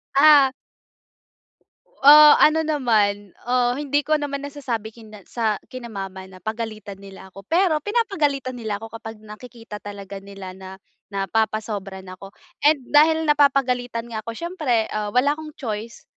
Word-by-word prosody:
Ah 285 -2 +7 1.5
Uh, 300 +2 +8
ano 320 +1 +5
naman, 215 - 0
ah, 245 0 +1
hindi 290 +1 -1
ko 310 0 +2
naman 280 -1 -4
nasasabi 245 -7 -5
kina 215 -4 -14
sa 220 -3 -1
kina 255 -2 -9
mama 195 -2 -7
na 185 - -14
pagalitan 215 0 -6
nila 195 -1 -12
ako. 195 - -11
Pero, 335 -3 +2
pinapagalitan 300 - -1
nila 220 -4 -4
ako 225 +1 -10
kapag 220 -1 -8
nakikita 215 0 -11
talaga 200 -1 -9
nila 195 -2 -10
na 190 0 -11 0.4
napapasobra 200 -1 -2
na 185 - -10
ako 195 0 -12 0.3
and 295 -3 +3
dahil 320 +2 +5
napapagalitan 250 -5 +1
nga 220 - -3
ako 230 +1 -7
siyempre, 305 -10 -1
um, 210 -1 -3
wala 275 +3 +4
akong 305 0 -10
choice 225 -3 -6
230 Hz, 145 wpm, -22 LUFS, 210-285 Hz, 1.5 s, Uh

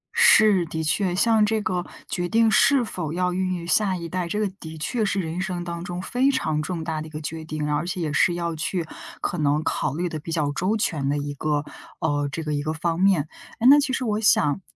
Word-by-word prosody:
是， 205 -5 +6
的 160 0 -3
确， 180 +3 0
像 220 +1 +4
这 220 +1 +1
个， 180 -3 -1 0.2
决 175 -1 -3
定 225 0 +4
是 275 +1 +4
否 170 -8 -4
要 180 0 0
孕 185 0 -1
育 170 -1 -6
下 190 +1 +2
一 170 -1 -6
代， 180 0 -3
这 210 +5 -2
个 210 - +1
的 160 0 -8
确 220 +9 -1
是 200 -1 0
人 170 0 -3
生 180 -2 -3
当 170 0 -5
中 175 0 -5
非 255 +6 +1
常 155 - 0
重 165 +1 -4
大 160 -1 -3
的 155 - -7
一 - - -11
个 150 - -7
决 160 +1 -5
定， 150 -1 -3
而 170 +4 -1
且 180 - -3
也 155 -3 -2
是 175 +2 +3
要 170 -1 -2
去 165 +2 -2 0.4
可 175 - -2
能 150 +1 +1
考 145 -3 -1
虑 175 +2 -1
得 155 - -5
比 165 +2 -8
较 150 -3 0
周 190 +9 0
全 145 -9 -1
的 145 - 0
一 145 0 -3
个 150 0 -1 0.3
呃， 145 -2 0
这 165 - -4
个 150 - -2
一 145 - -1
个 155 +1 -2
方 165 +1 -2
面。 185 -6 +3 0.3
哎， 240 - +3
那 290 +1 +8
其 280 -2 0
实 260 -1 -1
我 210 -1 0
想 195 -5 +3
170 Hz, 265 characters per minute, -24 LUFS, 155-195 Hz, 0.4 s, 那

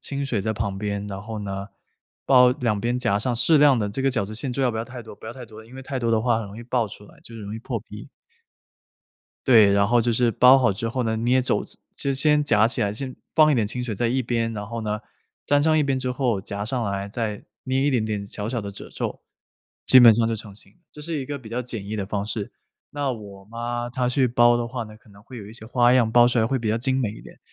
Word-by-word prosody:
清 140 0 -4
水 120 -6 -1
在 110 +3 -1
旁 100 -2 -3
边。 100 0 -3
然 100 -1 -6
后 110 +1 -6
呢， 100 -1 -5 0.6
包 125 -2 +6
两 115 -5 -1
边， 120 +3 -1
夹 100 -5 +1
上 120 +3 -1
适 125 +7 +3
量 145 -3 +5
的 105 -2 -1
这 120 +7 -4
个 135 - +2
饺 110 -6 -1
子 110 - -8
馅， 125 +4 -4
最 135 - -2
好 125 - +2
不 110 - -5
要 110 - -2
太 125 0 -9
多 110 - -11
不 - - -17
要 110 - -6
太 125 -1 -10
多。 110 0 -13
因 120 - -16
为 135 - -8
太 135 0 -4
多 115 -2 -1
的 110 -1 +2
话 120 -1 +1
很 115 - -5
容 100 +2 -10
易 - - -8
爆 120 -1 0
出 105 0 -12
来， - - -18
就 115 - -14
容 105 -2 -7
易 - - -5
破 115 0 -4
皮。 105 -1 -11 1.4
对， 110 -6 +6
然 100 0 +3
后 120 +2 +3
就 120 +1 +1
是 120 +1 +2
包 125 +5 +7
好 120 -5 +2
之 115 +4 -4
后 125 +2 -2
呢， 110 -1 0
捏 120 +3 +2
褶 125 - 0
子。 - - -9 0.2
就 140 - -1
先 150 +2 +3
夹 110 -7 +4
起 120 +1 -1
来， 100 -1 0
先 130 +4 -5 0.2
放 155 0 +5
一 - - +3
点 115 -4 +2
清 125 +4 -3
水 120 -3 -3
在 115 +4 0
一 130 +3 0
边。 115 -2 -1
然 105 -2 -5
后 115 0 -5
呢， 105 -1 -2 0.5
粘 145 0 +3
上 155 +1 +3
一 150 - +3
边 135 -1 0
之 130 0 -2
后， 125 -5 0
夹 100 +1 -5
上 120 +3 -2
来， 100 -2 -3
再 105 -1 -4 0.2
捏 130 0 0
一 140 - +2
点 125 -6 +1
点 105 -2 -3
小 105 +1 -5
小 120 -1 -2
的 100 -1 -7
褶 100 - -11
皱， - - -5 0.6
基 130 - +8
本 120 -2 +9
上 115 +1 +1
就 115 - -1
成 105 -1 -8
形。 100 - -13 0.2
这 150 - -12
是 160 +2 -4
一 - - -4
个 145 +1 -5
比 115 -4 -12
较 120 +2 -3
简 115 -5 -6
易 110 - -4
的 105 -2 -2
方 100 +1 -3
式。 105 -2 -4 0.4
那 145 -2 -2
我 100 -4 -10
妈， 120 +2 -4
她 125 0 -1
去 130 +1 +2
包 120 0 +4
的 120 0 -2
话 120 0 -4
呢， 110 -1 -11
可 110 - -24
能 100 0 -17
会 125 +3 -12
有 100 - -9
一 105 - -11
些 115 -1 -10
花 120 +1 +3
样， 120 -3 +3
包 120 +1 +6
出 120 -1 +2
来 110 - +2
会 130 +3 0
比 115 - -5
较 110 - +1
精 130 +2 0
美 115 -5 -1
一 - - -12
点。 - - -14
115 Hz, 305 characters per minute, -23 LUFS, 105-125 Hz, 1.4 s, 本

